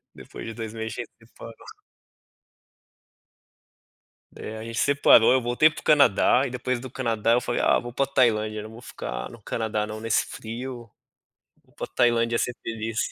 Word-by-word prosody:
Depois - - -10
de 115 - -5
2 110 -2 -6
meses 110 0 -5
a - - -4
gente 120 - -7
separou. 115 0 -13 2.7
Né? 110 - -8
A 110 - -7
gente 115 0 -5
separou, 140 -3 +5
eu 130 - +3
voltei 125 +6 +4
pro 155 - -10
Canadá 140 -4 +4
e - - -5
depois 125 0 -2
do 130 +1 -8
Canadá 115 -3 0
eu 120 - +4
falei: 120 - -2
"Ah, - - +4
vou 120 0 -6
pra 135 +3 0
Tailândia. 110 -5 +1
Não 110 - -9
vou 115 +2 -12
ficar - - -6
no 120 - -13
Canadá 110 0 -2
não, 110 0 -7
nesse 115 -1 +1
frio. 120 +1 -7 0.7
Vou - - -30
pra - - -5
Tailândia 115 -1 +1
ser 125 - -1
feliz." 115 0 -4
115 Hz, 175 wpm, -25 LUFS, 110-125 Hz, 2.7 s, separou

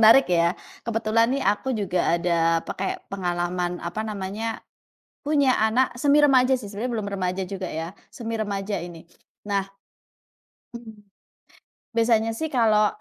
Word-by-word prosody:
menarik 230 +5 +8
ya. 170 +1 +3 0.2
Kebetulan 230 0 +1
nih, 275 +1 -1
aku 220 +5 +1
juga 180 -4 +1
ada 165 -1 +1
pakai 190 - -4
pengalaman 175 -1 -1
apa 175 +5 -3
namanya, 215 +1 -4 0.6
punya 285 -3 +3
anak 235 +4 +2
semi 285 +4 +3
remaja 265 -3 +5
sih 215 - -8
sebenarnya 215 +5 -4
belum 210 - -3
remaja 185 0 -1
juga 190 0 -5
ya, 165 +4 -5 0.2
semi 230 -1 -5
remaja 205 -2 -2
ini. 170 -2 -10 0.4
Nah, 200 -1 +1 1.1
mmm. 220 -3 -11 0.9
Biasanya 230 -1 +2
sih 320 - -2
kalau, 215 -4 +4
215 Hz, 135 wpm, -24 LUFS, 185-235 Hz, 1.1 s, menarik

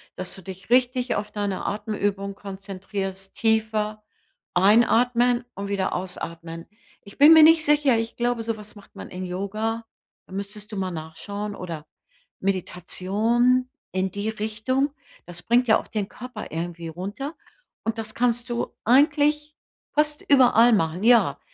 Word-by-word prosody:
Dass 185 - -5
du 190 - -9
dich 190 +2 -10
richtig 250 0 +2
auf 210 0 -3
deine 205 -2 -3
Atemübung 205 -1 -2
konzentrierst, 195 -1 -6
tiefer 215 -1 0 0.5
einatmen 240 +5 +4
und 200 +1 -5
wieder 195 -2 -1
ausatmen. 165 -2 -5 0.4
Ich 200 - -14
bin 295 +3 +9
mir 320 -1 +9
nicht 320 0 +7
sicher, 290 -4 +4
ich 225 +1 -3
glaube, 240 -1 0
so 225 -1 -2
was 210 0 -11
macht 205 -1 -17
man - - -9
in 185 +1 -6
Yoga, 215 +5 -3 0.4
da - - -13
müsstest 205 +2 -6
du 210 - -5
mal 190 -1 -2
nachschauen. 200 +6 -6
Oder 165 -4 -7 0.5
Meditation, 210 +7 0 0.2
in 190 0 0
die 205 +3 -3
Richtung. 220 +6 -1 0.3
Das 175 0 -8
bringt 240 +6 +3
ja 220 - +5
auch - - -11
den 210 -2 -3
Körper 250 +1 -8
irgendwie 170 +1 -4
runter 200 - -6 0.5
und 225 +1 -2
das 215 -1 -6
kannst 240 0 0
du 240 0 -3
eigentlich 295 +4 +3 0.4
fast 300 0 +1
überall 245 -3 +6
machen. 175 -2 0
Ja, 225 - +4
215 Hz, 150 wpm, -24 LUFS, 190-240 Hz, 0.5 s, bin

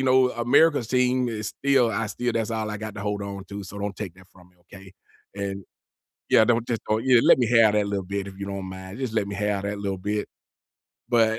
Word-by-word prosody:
you - - +1
know, 130 0 +4
America's 125 +1 +3
team 125 0 +2
is 105 -2 -4
still 135 -4 +2
I 110 +1 -1
still 120 +3 -2
that's 115 0 -1
all 110 -1 -2
I 105 - -4
got 110 -1 -6
to 105 - -6
hold 105 -1 -2
on 100 -1 -6
to, 100 0 -5
so 100 +2 -9
don't 100 -2 -4
take 95 -5 -6
that 95 0 -18
from 90 -1 -19
me, 90 - -32
okay? 95 +2 -14 0.4
And 100 -1 -4 0.7
yeah, 110 - +6
don't 120 -1 +2
just 115 -2 -2
oh, 110 - +3
yeah, 125 0 +4
let - - +6
me 120 - +2
have 110 -2 +5
that 105 -1 +2
little 100 -2 -2
bit, 100 0 -3
if 95 0 -10
you 100 - -5
don't 100 -1 -5
mind. 95 +3 -8
Just 130 -4 -3
let 100 -3 0
me 100 - -5
have 105 -1 -1
that 100 0 -3
little 100 -2 -3
bit. 105 +2 -2 0.8
But, 115 -2 +4
105 Hz, 250 wpm, -25 LUFS, 100-115 Hz, 0.8 s, yeah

